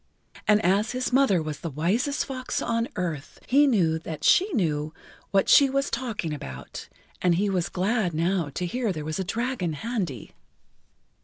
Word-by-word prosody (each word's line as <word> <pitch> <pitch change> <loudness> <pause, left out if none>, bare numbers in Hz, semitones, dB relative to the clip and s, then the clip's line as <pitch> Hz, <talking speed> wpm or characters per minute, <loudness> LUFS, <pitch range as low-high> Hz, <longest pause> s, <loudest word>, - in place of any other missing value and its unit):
And 210 -1 +5
as 200 +5 +2
his 255 0 -2
mother 255 -11 +4
was 155 -1 -5
the 165 - -4
wisest 195 - 0
fox 255 -2 -3
on 230 0 -1
earth, 165 -6 -4
he 285 +3 +4
knew 170 -10 +2
that 160 -2 -7
she 390 +3 +4
knew 155 - -1 0.4
what[Pg 195 - +4
18] - - -21
she 280 -2 +6
was 275 +1 -1
talking 225 -10 -3
about, 65 - -8 0.3
and 180 -2 +3
he 200 +3 +1
was 180 -3 0
glad 195 0 0
now 165 0 0
to 180 - -2
hear 235 +3 -1
there 155 -4 -5
was 155 +4 -3
a - - 0
dragon 225 -3 -2
handy. 180 - -4
190 Hz, 175 wpm, -26 LUFS, 160-245 Hz, 0.4 s, she